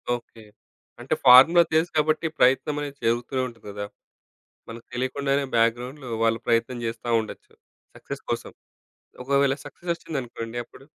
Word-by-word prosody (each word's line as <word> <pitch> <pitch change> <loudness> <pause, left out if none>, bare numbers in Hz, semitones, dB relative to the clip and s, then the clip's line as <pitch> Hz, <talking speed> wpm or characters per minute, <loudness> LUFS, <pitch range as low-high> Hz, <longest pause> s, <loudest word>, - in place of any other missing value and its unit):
Okay. 115 -1 -12 0.6
అంటే - - -2
formula 135 +8 +9
తెలుసు 160 +2 +2
కాబట్టి 155 +2 +2
ప్రయత్నమనేది 140 +2 +1
జరుగుతూనే 120 +3 0
ఉంటది 115 -3 -14
గదా! 100 0 -5 0.8
మనకు 115 0 -10
తెలియకుండానే 135 +3 -1
బ్యాక్‌గ్రౌండ్‌లో 120 +3 0
వాళ్ళు 115 0 +2
ప్రయత్నం 115 +2 +1
జేస్తా 115 +1 -5
ఉండొచ్చు. 110 - -9 0.4
సక్సెస్ - - -8
కోసం. - - -3 0.7
ఒకవేళ 140 0 +2
సక్సెస్ 175 - -8
వచ్చిందనుకోండి 120 -8 -6
అప్పుడు? 135 - -17
125 Hz, 120 wpm, -25 LUFS, 115-140 Hz, 0.8 s, formula